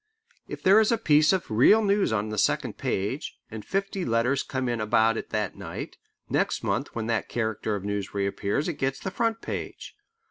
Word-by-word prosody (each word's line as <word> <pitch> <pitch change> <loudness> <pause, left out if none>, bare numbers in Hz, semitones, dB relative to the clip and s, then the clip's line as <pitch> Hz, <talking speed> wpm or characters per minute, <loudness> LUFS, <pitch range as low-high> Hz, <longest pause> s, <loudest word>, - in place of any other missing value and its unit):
If - - -8
there 195 +3 +7
is 220 +1 +3
a 230 - +3
piece 155 -7 +4
of 185 -10 -1
real 170 - +5
news 200 - +2
on 110 -1 -1
the 105 -1 -2
second - - +1
page, 105 +10 -2
and 110 -1 -7
fifty 195 - -2
letters 120 +3 +1
come 130 -1 -3
in 120 -2 -1
about 110 +1 +3
it - - -5
that 105 -3 -2
night, - - -7 0.3
next - - 0
month - - -2
when 115 -1 -2
that 115 -2 -1
character 110 -2 -2
of 100 - -5
news 100 -2 -3
reappears 100 +6 -1
it 170 - -4
gets 135 0 0
the 190 - -4
front 230 +1 -1
page. - - -6
120 Hz, 200 wpm, -26 LUFS, -, 0.3 s, there